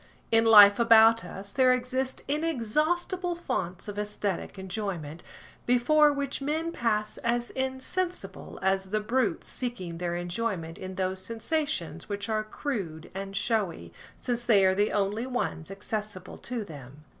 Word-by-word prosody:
In 225 0 +5
life 205 -2 +9
about 225 -2 +6
us, 195 +3 -8
there 255 -1 +5
exist 255 +1 -2
inexhaustible 325 - 0
fonts 180 - -3
of 205 -1 -6
æsthetic 205 -2 -3
enjoyment, 185 -5 -5 0.5
before 295 +5 +5
which 280 -1 -3
men 315 +4 -1
pass 215 -7 -1
as 240 +1 -1
insensible 265 +8 -3
as 190 0 +1
the 215 +2 +1
brutes 215 -3 0
seeking 185 -10 -4
their 175 -1 -2
enjoyment 175 -1 -3
in 185 0 -7
those 185 0 -1
sensations 225 - -2
which 205 +1 -4
are 215 -1 0
crude 205 - -5
and 195 +1 -5
showy, 195 - -1 0.2
since 240 -1 -2
they 210 -5 +5
are 190 - +4
the 205 +2 +1
only 205 +4 0
ones 245 -10 -3
accessible 205 -1 -5
to 235 -3 -4
them. 145 -3 -11
215 Hz, 140 wpm, -28 LUFS, 190-255 Hz, 0.5 s, life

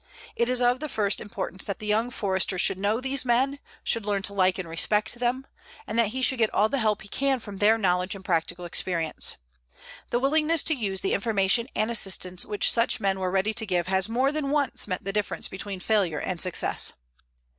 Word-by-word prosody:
It 235 +1 0
is 250 -1 +1
of 245 +1 +3
the 305 +1 -4
first 205 -4 0
importance 190 -3 -5
that 200 - -4
the 215 - -9
young 220 +3 +1
Forester 190 -4 -1
should 185 +1 +1
know 205 +3 0
these 265 +1 0
men, 260 +3 +1 0.2
should 230 - 0
learn 200 -1 -1
to 200 - -1
like 185 -2 +2
and 185 -3 -5
respect 210 +6 +2
them, 250 +2 -1 0.4
and 230 - -2
that 230 - +4
he 260 +5 -4
should 260 -1 +4
get 220 -2 +2
all 215 +1 +3
the 275 - -1
help 215 -3 0
he - - -12
can 270 +4 0
from 205 -3 -9
their 215 +3 +4
knowledge 180 -2 0
and 190 -1 -12
practical 175 +1 -1
experience. 170 -1 0 0.7
The - - +1
willingness 305 +4 +2
to 320 - 0
use 200 -8 -2
the 195 - -1
information 205 +2 +2
and 215 +2 0
assistance 185 -4 +1
which 205 -1 +3
such 230 0 +1
men 195 -1 0
were 185 -1 -1
ready 195 +3 0
to 225 +1 -1
give 180 -5 -1
has 190 +2 0
more 255 +4 +1
than 300 -2 -2
once 285 -5 0
meant 185 -3 -3
the 195 - -4
difference 210 0 -2
between 195 0 -7
failure 180 -6 0
and 180 -2 -3
success. 185 -2 +2
210 Hz, 215 wpm, -26 LUFS, 190-245 Hz, 0.7 s, that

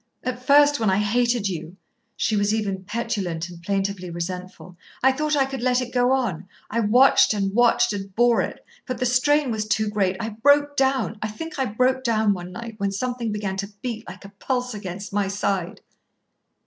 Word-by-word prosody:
"At 250 0 -3
first, 290 +1 +5
when 220 -3 +2
I 190 - +2
hated 235 +1 +1
you," 170 -1 -6 0.4
she 220 - 0
was 205 +1 +2
even 195 -3 -2
petulant 200 -6 -3
and 175 -1 -12
plaintively 195 0 -2
resentful, 180 +1 -6 0.3
"I 265 - +6
thought 300 +3 0
I 275 -2 +3
could 270 -2 -6
let 250 0 +2
it 250 -1 -5
go 245 0 +3
on. 230 -10 -1 0.2
I 230 - 0
watched, 230 +1 +5
and 195 -1 -1
watched, 240 -1 +3
and 195 -1 -6
bore 240 0 +4
it. - - -6 0.2
But 255 -2 -3
the 250 - -1
strain 265 +2 +2
was 215 -1 -2
too 215 -1 +1
great. 195 -3 0
I 225 - -3
broke 285 +6 +3
down. 265 -5 +1
I 215 - -1
think 295 +9 -7
I 265 - +2
broke 255 +4 +1
down 220 -4 +2
one 180 -1 -7
night, 230 +1 -8
when 200 0 0
something 240 +2 -3
began 200 -2 -3
to 200 +1 -4
beat 230 -3 -4
like - - -11
a - - -9
pulse 250 +4 -3
against 200 -1 -7
my 205 -1 +1
side." 195 -2 -2
220 Hz, 200 wpm, -23 LUFS, 195-250 Hz, 0.4 s, I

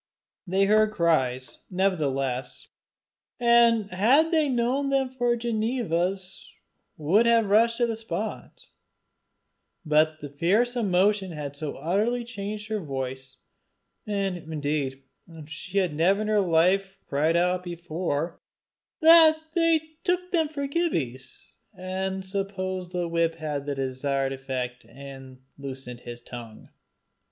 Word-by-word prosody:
They 190 +2 +2
heard 215 +1 +4
the 215 - -14
cries, 130 -8 0
nevertheless, 140 -9 -1 0.7
and 235 -3 +4
had 260 - +4
they 310 -3 +3
known 255 +3 0
them 270 -1 +1
for 245 -2 +1
Ginevra's, 215 -6 -2 0.5
would 190 +10 +3
have 230 -1 +4
rushed 230 +3 +3
to 240 - +3
the 230 -1 -2
spot; 225 0 -5 1.2
but 155 +1 +2 0.2
fierce 225 +8 +2
emotion 195 -3 +1
had 145 -2 -6
so 145 0 -4
utterly 220 +8 0
changed 210 -2 -6
her 215 -1 -1
voice 130 -4 -5 0.7
and 195 -3 -1
indeed 145 -4 -3 0.4
she 170 +5 -7
had 185 -5 +2
never 185 +7 +2
in 215 - -3
her 210 -1 +3
life 190 +3 +2
cried 155 +4 +1
out 180 +1 +1
before 170 -2 -3 0.6
that 320 -1 +8 0.2
they 330 -2 +3 0.2
took 360 0 -1
them 325 -4 +2
for 285 -2 -4
Gibbie's 155 - -3 0.2
and 190 +1 -3
supposed 190 -2 -4
the 175 -1 -2
whip 165 -1 0
had 155 -2 -5
had 140 -1 -3
the 145 - -2
desired 135 +1 -1
effect 130 -2 -5
and 135 -1 -12 0.2
loosed 135 -2 -7
his 120 0 -9
tongue. 120 -2 -10
185 Hz, 125 wpm, -26 LUFS, 145-225 Hz, 1.2 s, that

